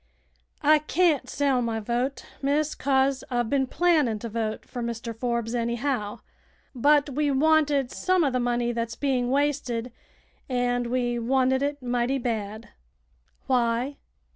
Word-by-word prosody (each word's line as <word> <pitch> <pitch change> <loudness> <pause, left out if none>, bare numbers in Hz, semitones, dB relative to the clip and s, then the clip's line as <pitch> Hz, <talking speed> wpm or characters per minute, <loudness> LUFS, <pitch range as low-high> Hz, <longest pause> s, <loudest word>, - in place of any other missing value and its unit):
I 305 +1 +6
can't 305 -4 +1
sell 275 -3 +1
my 230 -2 -1
vote, 245 +5 -2 0.2
miss, 290 +2 +1
'cause 270 -1 +1
I've 240 -3 -1
been 270 -2 +2
plannin' 305 -9 +2
t'vote 220 0 -4
fer 245 - -6
Mr. 235 -1 -4
Forbes 235 -1 -2
anyhow. 235 -2 -2 0.5
But 290 +3 +3
we 290 +2 0
wanted 290 -2 +3
some 370 -2 +1
uv 275 -4 +1
th' 250 - +1
money 240 0 0
that's 230 -1 -3
being 255 -3 0
wasted, 260 -4 0 0.6
an' 245 -1 0
we 240 -1 0
wanted 260 +2 +2
it 285 -1 -2
mighty 245 +2 0
bad." 220 -3 -4 0.8
"Why?" 245 +2 0
250 Hz, 135 wpm, -26 LUFS, 235-280 Hz, 0.8 s, I